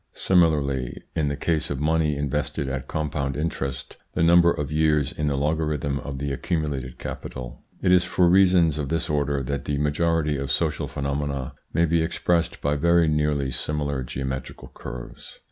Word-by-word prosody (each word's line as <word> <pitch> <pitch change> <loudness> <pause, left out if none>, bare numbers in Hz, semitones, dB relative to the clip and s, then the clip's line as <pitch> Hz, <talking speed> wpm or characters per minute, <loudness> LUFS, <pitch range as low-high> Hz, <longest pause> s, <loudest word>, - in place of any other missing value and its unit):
Similarly 70 -8 +1
in 75 -2 +1
the 70 - -1
case 80 +1 0
of 70 - -3
money 75 0 +1
invested 70 0 -2
at 65 0 -4
compound 70 -3 -2
interest, 70 -4 -4 0.2
the - - +2
number 85 +1 +6
of 75 -3 -3
years 75 -2 +2
is 75 - -2
the 70 - +1
logarithm 75 -1 0
of 70 -1 -6
the 70 +1 -3
accumulated 70 -3 -2
capital. 60 -1 -7 0.2
It 90 - +3
is 90 -1 +6
for 90 0 +2
reasons 90 -4 +4
of 70 -3 -3
this 80 0 -1
order 70 -2 0
that 70 +1 -3
the 75 - -1
majority 75 +1 +1
of 70 0 -4
social - - 0
phenomena 70 -1 -3 0.2
may 85 - +3
be 85 0 +2
expressed 85 0 0
by 75 +1 +1
very 85 +2 +4
nearly 75 -3 +1
similar 70 +1 -1
geometrical 65 +1 -5
curves. - - -9
75 Hz, 165 wpm, -24 LUFS, 70-80 Hz, 0.2 s, number